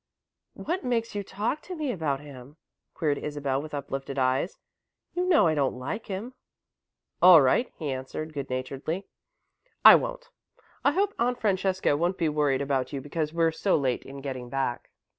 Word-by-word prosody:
"What 355 +4 -3
makes 230 -2 -1
you 205 - -2
talk 210 +9 -3
to 365 - -7
me 305 -5 -2
about 150 - -2
him?" 140 0 -12 0.4
queried 145 -3 0
Isabel, 140 -2 -2
with 150 0 -7
uplifted 135 -1 -5
eyes. 130 +6 +1 0.6
"You 360 +1 -1
know 330 - +5
I 160 - +3
don't 140 -4 0
like 205 - -5
him." 210 +6 -5 0.9
"All 180 -2 +10
right," 145 - +2
he 150 -4 -3
answered, 135 +4 -5
good 140 -2 -5
naturedly. 135 +8 -3 0.8
"I - - +13
won't. - - 0 0.5
I 280 - +4
hope 400 +3 +1
Aunt 245 +1 +1
Francesca 190 -5 +1
won't 175 +5 0
be 165 -3 +1
worried 145 -2 +1
about 135 -2 -1
you 140 - -3
because 150 +2 -3
we're 165 0 +2
so 185 +4 +1
late 130 -4 0
in 135 +1 -9
getting 130 -3 -5
back." 135 -2 -2
155 Hz, 170 wpm, -27 LUFS, 135-205 Hz, 0.9 s, I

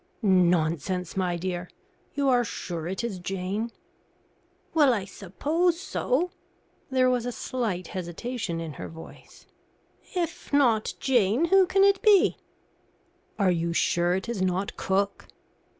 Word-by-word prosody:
"Nonsense, 180 -2 +2
my 180 -2 0
dear. 175 0 -4 0.5
You 280 -1 +1
are 250 -2 +4
sure 170 -6 -5
it 190 +6 -3
is 210 -6 -3
Jane?" 195 +5 -3 1.0
"Well 290 -6 +5
I 200 -3 -3
suppose 305 - -1
so." 350 -2 -1 0.6
There 260 -1 +3
was 250 -1 +1
a - - -1
slight 220 -7 -3
hesitation 185 +1 -4
in 165 -2 -5
her - - -5
voice. 165 0 -13 0.7
"If 345 -3 -3
not 245 -7 +3
Jane, 245 - +2
who 380 +1 +5
can 390 +2 +3
it 395 -1 +4
be?" 415 -3 +5 1.0
"Are 195 -3 +3
you 170 -1 -1
sure 175 +1 +2
it 190 - -3
is 235 -5 -3
not 185 +1 -1
cook?" 195 +1 -1
200 Hz, 135 wpm, -26 LUFS, 180-260 Hz, 1.0 s, Well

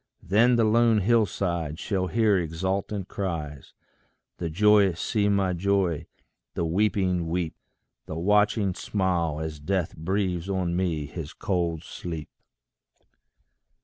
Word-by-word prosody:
Then 115 +7 +4
The 115 - +3
lone 115 0 +4
hill 115 +1 +3
side 85 -6 -2
shall 95 0 -1
hear 110 0 +3
exultant 95 +3 -2
cries; 80 -9 -5 0.6
The 85 - -2
joyous 100 0 +4
see 105 -2 +1
me 100 -2 +2
joy, 95 -3 0 0.5
the 85 - 0
weeping 90 -1 +1
weep; 85 -1 -2 0.5
The 80 - -5
watching 105 +2 +2
smile, 85 -6 -1
as 80 -1 -5
Death 90 +2 -1
breathes 90 +1 -2
on 90 -3 -1
me 85 -5 -1
his 75 +1 -7
cold 85 -4 -1
sleep. 80 -5 -6
90 Hz, 120 wpm, -26 LUFS, 85-100 Hz, 0.6 s, Then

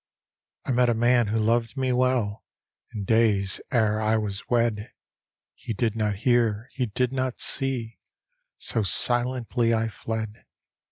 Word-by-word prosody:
I - - -1
met 125 0 +3
a 120 - +2
man 120 0 +3
who 110 +2 -1
loved 115 +3 0
me 130 -1 0
well 125 -4 0 0.5
In 105 - -5
days 105 -3 +2
ere 110 -4 +2
I 110 +1 +2
was 105 -2 -4
wed, 115 -1 0 0.6
He 115 - -6
did 115 0 0
not 105 -2 0
hear, 120 -2 +2
he 125 -2 -2
did 125 +4 -1
not 130 -2 -2
see, 125 -4 -1 0.6
So 115 - -2
silently 120 +3 +1
I 110 0 0
fled. 110 0 -5
115 Hz, 145 wpm, -25 LUFS, 110-125 Hz, 0.6 s, met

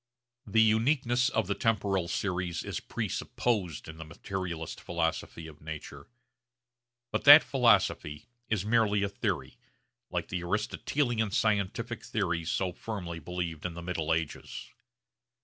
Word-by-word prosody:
The 110 +2 +5
uniqueness 120 +2 +3
of 110 - 0
the 100 - 0
temporal 100 -5 0
series 90 -2 -2
is - - -4
presupposed 95 -11 -2
in 80 +1 -9
the 80 - -6
materialist 85 +1 -5
philosophy 85 -1 -2
of 75 -2 -12
nature. 80 -1 -8 1.0
But - - -1
that 145 +2 +11
philosophy 105 - +2 0.2
is 105 -3 0
merely 105 -2 +3
a 100 - 0
theory, 95 -10 -3 0.5
like - - -3
the 90 - -2
Aristotelian 110 +4 0
scientific 110 +3 0
theories 85 -6 -1
so 95 -2 0
firmly 90 -7 -5
believed 85 -1 -4
in 90 -2 -4
the 85 - -7
middle 85 -3 -2
ages. 80 -2 -3
95 Hz, 130 wpm, -30 LUFS, 85-110 Hz, 1.0 s, that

